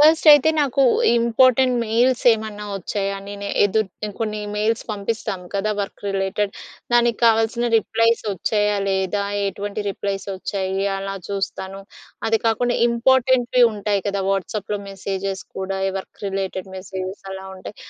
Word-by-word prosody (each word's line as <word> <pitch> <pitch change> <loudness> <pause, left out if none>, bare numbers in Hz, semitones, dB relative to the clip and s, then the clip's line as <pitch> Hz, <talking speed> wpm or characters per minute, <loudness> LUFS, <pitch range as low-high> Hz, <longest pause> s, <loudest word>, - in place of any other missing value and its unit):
First 315 +2 +5
అయితే 295 +1 +7
నాకు 275 -1 +2 0.4
important 255 +2 +4
mails 235 +3 +2
ఏమన్నా 215 -1 -4
వచ్చాయా? 195 +1 -3
నేను 200 0 -6 0.2
ఎదు 205 +2 +2 0.4
కొన్ని 215 -1 -2
మెయిల్స్ 215 +2 0
పంపిస్తాం 210 -1 -3
కదా! 200 +2 0
Work 200 - -6
related. 195 +1 -1 0.4
దానికి 240 -1 +3
కావాల్సిన 225 +1 +3
రిప్లైస్ 230 +1 +2
వచ్చాయా? 210 +2 0
లేదా? 190 +1 0 0.3
ఎటువంటి 200 +2 -4
రిప్లైస్ 195 0 -4
వచ్చాయి 190 0 -3 0.2
అలా 195 0 -4
చూస్తాను. 195 -1 -4 0.5
అది 225 - +3
కాకుండా 240 +2 +1
ఇంపార్టెంట్‌వి 250 +1 +3
ఉంటాయి 205 -1 -1
కదా! 200 -1 -1
వాట్సాప్‍లో 200 +1 -2
మెసేజెస్ 195 0 -4 0.2
కూడా 190 0 -3 0.2
వర్క్ - - -11
రిలేటెడ్ 195 -1 -3
మెసేజెస్ 190 +1 -6
అలా 190 0 -7
ఉంటాయి 190 +2 -10
205 Hz, 125 wpm, -21 LUFS, 195-230 Hz, 0.5 s, అయితే